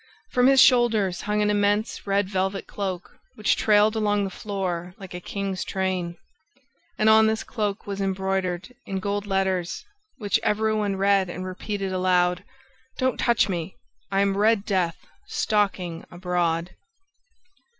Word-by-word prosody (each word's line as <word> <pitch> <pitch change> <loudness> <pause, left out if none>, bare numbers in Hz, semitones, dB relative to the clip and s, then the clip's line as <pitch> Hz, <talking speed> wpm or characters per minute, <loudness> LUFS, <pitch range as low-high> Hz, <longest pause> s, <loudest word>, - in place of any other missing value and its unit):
From 250 0 +4
his 270 0 +6
shoulders 225 -9 +4
hung 210 0 0
an 210 - +2
immense 205 +1 0
red 200 0 +1
velvet 190 0 -2
cloak, 190 -3 -5 0.2
which 215 - +2
trailed 215 0 +3
along 205 -2 +1
the 195 - -3
floor 180 -3 -4
like 190 -2 -10
a 180 - -5
king's 195 0 -4
train; 185 -2 -2 0.8
and 215 - +2
on 220 0 +7
this 220 0 0
cloak 210 -3 -3
was 200 -1 -4
embroidered, 190 +1 -2
in 195 - -3
gold 205 +1 -2
letters, 190 - -1 0.3
which 205 -5 +1
every 215 +1 +1
one 205 -2 0
read 195 -1 +2
and 185 +1 -5
repeated 195 +1 -4
aloud, 180 0 +2 0.5
"Don't 260 -1 0
touch 235 -2 +3
me! 175 -2 -4 0.3
I 195 0 +2
am 200 -1 +2
Red 210 0 +3
Death 180 -4 0 0.3
stalking 190 -5 -1
abroad!" 175 -1 -1
195 Hz, 145 wpm, -25 LUFS, 185-210 Hz, 0.8 s, on